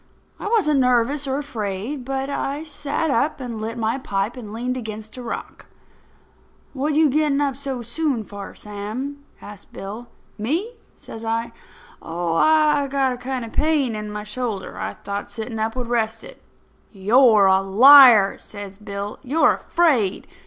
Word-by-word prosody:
I - - -5
wasn't 390 -11 +2
nervous 250 +3 +2
or 265 0 -1
afraid; 235 -1 -4
but 270 0 -2
I 285 +1 -3
sat 295 0 -2
up 280 +5 0
and 235 -4 -6
lit 225 +2 -4
my 225 +3 -1
pipe 200 -1 -2
and 225 -5 -9
leaned 245 +3 -3
against 220 -3 -7
a 255 - -7
rock. 240 - -7 1.1
"What 290 +2 -1
you 315 0 +5
getting 295 0 +1
up 280 -2 0
so 270 -3 -5
soon 255 0 -2
for, 200 -1 -9
Sam?" 220 +8 -6 0.2
asked 205 -2 -12
Bill. 215 +5 -7 0.3
"Me?" 325 - -1 0.3
says 225 - -10
I. 230 +1 -2 0.5
"Oh, 170 0 -3
I 300 - +3
got 270 -1 +1
a - - -7
kind 255 -1 -4
of 225 - -11
a - - -15
pain 295 -7 +1
in 210 0 -5
my 210 0 -5
shoulder. 210 -2 -4
I - - -4
thought 200 0 -6
sitting 220 +2 -5
up 220 +2 -1
would 250 -1 -3
rest 225 -1 -1
it." - - -13 0.5
"You're 215 +1 +5
a 190 0 +4
liar!" 225 +1 +8
says 205 -1 -9
Bill. 205 -1 -6
"You're 290 +5 +3
afraid. 265 - +1
240 Hz, 165 wpm, -22 LUFS, 210-280 Hz, 1.1 s, liar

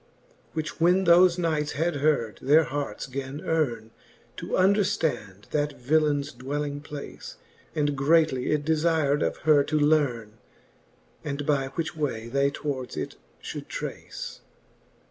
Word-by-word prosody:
VII. - - -34 0.2
Which 155 0 -4
when 180 +3 +4
thofe 175 +1 +6
knights 155 -4 0
had 165 +1 0
heard, 140 -7 +1
their 150 +4 +5
harts 145 -1 -4
gan 135 +1 -5
eame, 120 -9 -1 0.5
To - - -6
underftand 185 - +1
that 145 -1 -1
villeins 145 +1 +1
dwelling 145 +3 -4
place. 145 -1 -8 0.4
And 145 -1 +1
greatly 140 -2 +2
it 150 -1 0
defir'd 155 -2 +2
of - - 0
her 150 -2 +6
to 155 - 0
learne. 125 -8 +1 0.8
And 145 -1 -3
by 140 -2 +1
which 165 -2 -3
way 115 -7 -3
they 140 +2 +2
towards 140 -3 -4
it - - -4 0.3
fhould - - -6
trace. - - -6
145 Hz, 135 wpm, -26 LUFS, 140-160 Hz, 0.8 s, thofe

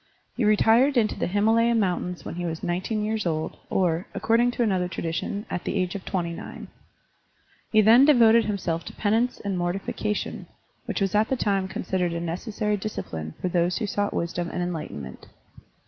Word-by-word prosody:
He 245 - -1
retired 225 +6 +4
into 215 -3 +3
the - - -2
Himalaya 225 +4 +3
Mountains 180 -4 -1
when - - -5
he 175 +1 -4
was 160 -1 -5
nineteen 190 +5 -1
years 215 -3 -1
old, 155 -1 -2
or, 175 -1 +1
according 235 +2 +3
to 245 - 0
another 190 -5 +1
tradition, 175 +5 -3
at 180 - -4
the - - -2
age 185 -1 0
of 200 - -6
twenty 175 -3 -2
nine. - - -8 1.0
He 215 - +6
then 230 +6 +7
devoted 235 -5 +6
himself 180 -5 -2
to - - -8
penance 225 +4 0
and 195 -3 -2
mortification, 195 +4 -3 0.4
which - - -2
was 195 -1 +1
at 210 +1 +3
the 265 - 0
time 195 -4 0
considered 180 -1 -2
a 170 - -2
necessary 205 +5 -2
discipline 80 - -5
for - - -2
those 175 0 +1
who 225 - -1
sought 205 0 -1
wisdom 170 0 -2
and 180 - -2
enlightenment. 150 - -6
195 Hz, 180 wpm, -25 LUFS, 175-220 Hz, 1.0 s, then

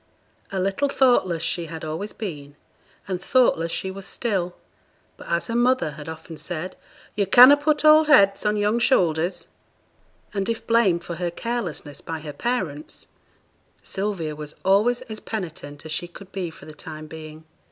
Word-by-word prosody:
A 195 - -2
little 195 +9 0
thoughtless 215 -12 +3
she 165 0 -1
had 160 0 -7
always 160 +7 -4
been, 145 -9 -7 0.5
and 185 -2 -3
thoughtless 190 -8 +2
she 190 - -3
was 195 +1 -8
still; 190 -7 -2 0.6
but, - - -13
as 170 0 0
her 230 - -3
mother 245 -8 +2
had 150 +2 -9
often 160 0 -9
said, 175 +2 -5 0.4
'Yo' 200 -2 0
canna 250 +8 +9
put 300 +1 0
old 310 0 +7
heads 200 -10 +5
on 210 0 +1
young 210 +3 +2
shoulders;' 175 - +2 0.9
and 195 +1 -2
if 230 - -3
blamed 200 -7 +3
for 170 -1 -6
her 175 0 -1
carelessness 175 -7 -4
by 160 -1 -5
her 150 -1 -7
parents, 165 - -3 0.8
Sylvia 190 -6 -3
was 150 0 -7
always 210 +6 +3
as 220 -1 -8
penitent 160 -8 -6
as 160 - -7
she 175 +2 -2
could 190 +2 -13
be 185 -3 -3
for 160 - -14
the 155 - -10
time 155 +1 -8
being. 155 0 -10
185 Hz, 165 wpm, -24 LUFS, 160-230 Hz, 0.9 s, canna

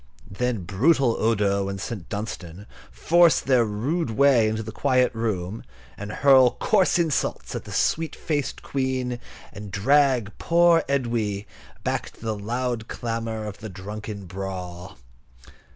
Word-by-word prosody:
Then 115 0 -2
brutal 120 - +2
Odo 100 -3 +1
and 95 0 -5
St. 95 -3 -6
Dunstan 100 -3 -6 0.2
force 170 0 +4
their 130 -3 +3
rude 120 +9 -1
way 120 -1 +4
into 110 +1 -2
the 110 - -7
quiet 130 +1 +2
room, 110 -3 -3 0.3
and 105 +1 -7
hurl 130 0 +5
coarse 190 -4 +3
insults 165 -5 -1
at - - -5
the - - -9
sweet 160 0 0
faced 145 -4 -3
Queen, 130 -2 -2 0.3
and 100 +1 -8
drag 125 +1 +2
poor 170 -1 +4
Edwy 115 -7 -1 0.4
back - - -2
to - - -21
the 110 -1 -2
loud 120 +2 -3
clamour 115 -2 -4
of 105 -2 -7
the 110 +1 -7
drunken 100 +2 -7
brawl. 90 -3 -7
115 Hz, 135 wpm, -24 LUFS, 100-130 Hz, 0.4 s, hurl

